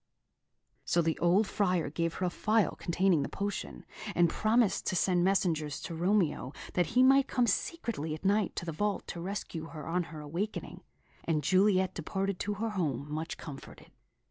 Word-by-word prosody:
So 170 Hz, -, +2 dB
the 160 Hz, 0 st, 0 dB
old 180 Hz, +5 st, +4 dB
Friar 180 Hz, -7 st, 0 dB
gave 165 Hz, +1 st, -1 dB
her 185 Hz, -, -1 dB
a 180 Hz, -, 0 dB
phial 215 Hz, +3 st, +2 dB
containing 175 Hz, -2 st, +2 dB
the 140 Hz, -, -3 dB
potion, 200 Hz, +1 st, -4 dB, 0.3 s
and 170 Hz, -1 st, +4 dB
promised 220 Hz, -2 st, +2 dB
to -, -, 0 dB
send 180 Hz, -1 st, +2 dB
messengers 170 Hz, -6 st, +1 dB
to 170 Hz, -, -6 dB
Romeo, 170 Hz, -6 st, +1 dB, 0.2 s
that 180 Hz, -, +2 dB
he 255 Hz, -, +7 dB
might 270 Hz, +1 st, +6 dB
come 245 Hz, -2 st, +2 dB
secretly 200 Hz, -, -1 dB
at 155 Hz, -, -12 dB
night 200 Hz, 0 st, +2 dB
to -, -, -4 dB
the 165 Hz, -, -3 dB
vault 205 Hz, +4 st, -1 dB
to 170 Hz, -, -5 dB
rescue 180 Hz, -3 st, -4 dB
her 155 Hz, -3 st, -8 dB
on 175 Hz, +1 st, 0 dB
her 155 Hz, 0 st, -9 dB
awakening; 170 Hz, +9 st, -4 dB, 0.4 s
and 155 Hz, -3 st, 0 dB
Juliet 190 Hz, +2 st, +3 dB
departed 190 Hz, +3 st, -2 dB
to 205 Hz, 0 st, -2 dB
her 225 Hz, +2 st, -2 dB
home 150 Hz, -, -2 dB
much 160 Hz, +2 st, -4 dB
comforted. 140 Hz, -3 st, -10 dB
180 Hz, 175 wpm, -31 LUFS, 165-205 Hz, 0.4 s, he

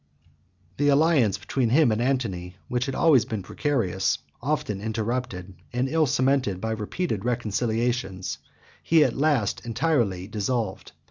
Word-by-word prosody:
The 145 Hz, -, +2 dB
alliance 140 Hz, -, +4 dB
between 130 Hz, -4 st, -1 dB
him 140 Hz, 0 st, +4 dB
and 110 Hz, +1 st, 0 dB
Antony, 105 Hz, -9 st, -1 dB
which 125 Hz, +1 st, -1 dB
had 135 Hz, -, -3 dB
always 150 Hz, -8 st, +5 dB
been 110 Hz, -4 st, -4 dB
precarious, 100 Hz, -9 st, 0 dB, 0.2 s
often 135 Hz, -7 st, -2 dB
interrupted, 110 Hz, -4 st, -3 dB, 0.2 s
and 125 Hz, +2 st, 0 dB
ill 155 Hz, +1 st, +2 dB
cemented 130 Hz, -7 st, +1 dB
by 110 Hz, +3 st, -2 dB
repeated 110 Hz, -, -2 dB
reconciliations, 115 Hz, -4 st, -1 dB, 0.4 s
he 160 Hz, -2 st, +4 dB
at -, -, 0 dB
last 140 Hz, -8 st, +1 dB
entirely 115 Hz, -, 0 dB
dissolved. 105 Hz, 0 st, -3 dB
120 Hz, 130 wpm, -25 LUFS, 105-135 Hz, 0.4 s, always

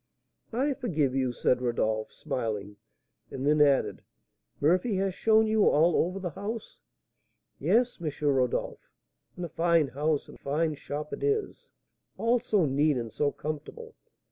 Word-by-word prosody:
"I 270 Hz, +5 st, +1 dB
forgive 160 Hz, -, -1 dB
you," 130 Hz, -2 st, 0 dB
said 125 Hz, +1 st, +1 dB
Rodolph, 110 Hz, -3 st, -1 dB
smiling; 110 Hz, -8 st, -4 dB, 0.5 s
and 130 Hz, -, -5 dB
then 150 Hz, +1 st, +4 dB
added, 140 Hz, -2 st, +3 dB, 0.6 s
"Murphy 180 Hz, +8 st, +2 dB
has 190 Hz, 0 st, 0 dB
shown 220 Hz, +3 st, +4 dB
you 215 Hz, -1 st, +4 dB
all 165 Hz, +3 st, +4 dB
over 180 Hz, +3 st, +1 dB
the 180 Hz, -3 st, -4 dB
house?" 210 Hz, +5 st, -6 dB, 0.8 s
"Yes, 245 Hz, -1 st, +2 dB
M. 160 Hz, -, -1 dB, 0.2 s
Rodolph; 130 Hz, -3 st, 0 dB, 0.5 s
and 180 Hz, -, -4 dB
a -, -, -7 dB
fine 165 Hz, -2 st, +2 dB
house 150 Hz, +2 st, -1 dB
and -, -, -13 dB
fine 155 Hz, +3 st, 0 dB
shop 150 Hz, +1 st, -6 dB
it -, -, -5 dB
is, 425 Hz, 0 st, -1 dB, 0.5 s
all 235 Hz, +2 st, +2 dB
so 210 Hz, -7 st, +1 dB
neat 145 Hz, +1 st, +2 dB
and 115 Hz, -2 st, -4 dB
so 145 Hz, -1 st, +1 dB
comfortable! 155 Hz, -, -7 dB
155 Hz, 145 wpm, -28 LUFS, 135-210 Hz, 0.8 s, then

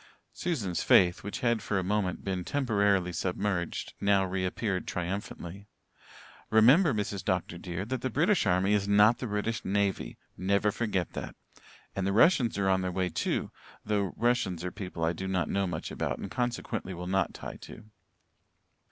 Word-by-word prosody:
Susan's 115 Hz, -, -2 dB
faith, 90 Hz, 0 st, +5 dB
which 100 Hz, -, -5 dB
had 120 Hz, -2 st, +2 dB
for 100 Hz, -, -1 dB
a 95 Hz, -, 0 dB
moment 95 Hz, -2 st, -1 dB
been 95 Hz, -2 st, -2 dB
temporarily 100 Hz, -8 st, +1 dB
submerged, 90 Hz, +1 st, -2 dB
now 100 Hz, -1 st, +3 dB
reappeared 95 Hz, +1 st, -2 dB
triumphantly. 95 Hz, +1 st, -5 dB, 0.8 s
"Remember, 135 Hz, -, +6 dB
Mrs. 100 Hz, -4 st, -2 dB
Dr. 90 Hz, -3 st, -1 dB
dear, 90 Hz, +2 st, -4 dB
that 130 Hz, +3 st, -3 dB
the 130 Hz, -, -1 dB
British 165 Hz, -, +2 dB
army 95 Hz, +2 st, +3 dB
is 100 Hz, -1 st, +1 dB
not 105 Hz, +4 st, +5 dB
the 125 Hz, -, -3 dB
British 105 Hz, +1 st, -2 dB
navy. 100 Hz, 0 st, -1 dB, 0.2 s
Never 100 Hz, +3 st, +1 dB
forget 105 Hz, -5 st, -2 dB
that. -, -, -6 dB, 0.6 s
And 95 Hz, -1 st, -1 dB
the 100 Hz, -, +1 dB
Russians 120 Hz, -, +4 dB
are 100 Hz, -1 st, +1 dB
on 95 Hz, 0 st, +3 dB
their 90 Hz, 0 st, -2 dB
way, 90 Hz, 0 st, 0 dB
too, 80 Hz, -, -2 dB, 0.3 s
though 100 Hz, -3 st, 0 dB
Russians 115 Hz, -8 st, +1 dB
are 90 Hz, -, -3 dB
people 90 Hz, -5 st, -6 dB
I 80 Hz, +1 st, +2 dB
do 95 Hz, +3 st, -5 dB
not 90 Hz, -4 st, 0 dB
know 100 Hz, -1 st, +1 dB
much 85 Hz, -3 st, -4 dB
about -, -, -2 dB
and 100 Hz, -, -7 dB
consequently 120 Hz, -6 st, -3 dB
will 90 Hz, +1 st, -6 dB
not 95 Hz, 0 st, 0 dB
tie -, -, -7 dB
to." -, -, -12 dB
100 Hz, 170 wpm, -29 LUFS, 90-110 Hz, 0.8 s, Remember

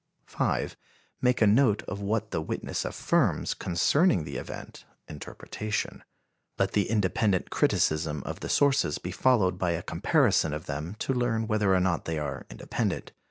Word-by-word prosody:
5. -, -, -1 dB, 0.5 s
Make 125 Hz, -2 st, +3 dB
a -, -, +6 dB
note 110 Hz, 0 st, +4 dB
of 100 Hz, -, -6 dB
what 110 Hz, +2 st, -1 dB
the 80 Hz, -, -1 dB
witness 80 Hz, -, -3 dB
affirms -, -, +1 dB
concerning 90 Hz, -, +2 dB
the 70 Hz, -3 st, -5 dB
event -, -, -8 dB, 0.2 s
(interpretation.) 105 Hz, +7 st, -5 dB, 0.5 s
Let 100 Hz, 0 st, +1 dB
the 100 Hz, -3 st, +1 dB
independent 100 Hz, -2 st, +1 dB
criticism 75 Hz, -2 st, +1 dB
of -, -, -6 dB
the -, -, -5 dB
sources 140 Hz, -, +3 dB
be 90 Hz, -, -6 dB
followed 95 Hz, -5 st, +2 dB
by 90 Hz, -2 st, +1 dB
a 85 Hz, +1 st, -3 dB
comparison 80 Hz, -, +2 dB
of 75 Hz, -, -7 dB
them 75 Hz, +7 st, -4 dB
to 135 Hz, -, -1 dB
learn 120 Hz, -3 st, 0 dB
whether 105 Hz, -3 st, +2 dB
or -, -, +4 dB
not 90 Hz, -2 st, 0 dB
they 80 Hz, -1 st, -2 dB
are 70 Hz, -3 st, -4 dB
independent. -, -, -3 dB
95 Hz, 160 wpm, -28 LUFS, 80-110 Hz, 0.5 s, a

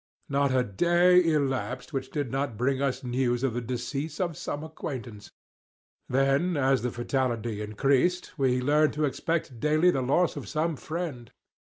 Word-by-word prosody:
Not 140 Hz, 0 st, +2 dB
a 130 Hz, -1 st, +3 dB
day 175 Hz, -, +4 dB
elapsed 135 Hz, -5 st, -1 dB
which 135 Hz, -1 st, -3 dB
did 145 Hz, -6 st, -3 dB
not 135 Hz, -4 st, -2 dB
bring 130 Hz, +3 st, 0 dB
us 135 Hz, -2 st, -1 dB
news 125 Hz, 0 st, 0 dB
of 135 Hz, -4 st, +1 dB
the 120 Hz, -, -2 dB
decease 130 Hz, +5 st, -4 dB
of 175 Hz, -4 st, -1 dB
some 145 Hz, +1 st, -4 dB
acquaintance. 120 Hz, -9 st, -7 dB, 0.8 s
Then 135 Hz, +6 st, +2 dB
as 135 Hz, -1 st, +2 dB
the 125 Hz, -, -1 dB
fatality 120 Hz, -3 st, -2 dB
increased, 135 Hz, -, +1 dB
we 130 Hz, -3 st, +1 dB
learned 150 Hz, +3 st, +3 dB
to 150 Hz, 0 st, 0 dB
expect 145 Hz, -3 st, -2 dB
daily 155 Hz, +5 st, +3 dB
the 135 Hz, -, -1 dB
loss 145 Hz, +7 st, +2 dB
of -, -, -7 dB
some 160 Hz, +1 st, 0 dB
friend. 155 Hz, -6 st, -5 dB
135 Hz, 160 wpm, -27 LUFS, 125-155 Hz, 0.8 s, day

